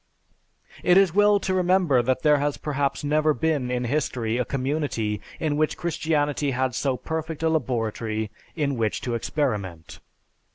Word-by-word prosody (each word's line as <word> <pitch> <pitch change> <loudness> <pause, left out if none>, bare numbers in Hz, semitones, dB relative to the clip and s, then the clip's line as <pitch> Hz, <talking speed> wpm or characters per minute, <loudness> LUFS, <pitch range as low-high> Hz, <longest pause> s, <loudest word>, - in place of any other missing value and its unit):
It 180 +1 +5
is 195 -4 +4
well 205 +1 +5
to 190 -1 -1
remember 180 -7 +3
that 130 +2 0
there 150 -1 +5
has 145 0 -1
perhaps 140 -2 -2
never 150 +1 +2
been 155 -6 0
in 125 0 -1
history 120 -3 -1
a - - +2
community 130 -6 -2 0.2
in 150 -2 0
which 155 0 +1
Christianity 150 -4 0
had 130 -1 0
so 130 +1 0
perfect 160 +1 -4
a 160 - +3
laboratory 115 -7 -1 0.2
in 140 -5 -1
which 110 -2 -1
to 120 - -3
experiment. 105 - -3
145 Hz, 155 wpm, -25 LUFS, 125-160 Hz, 0.2 s, It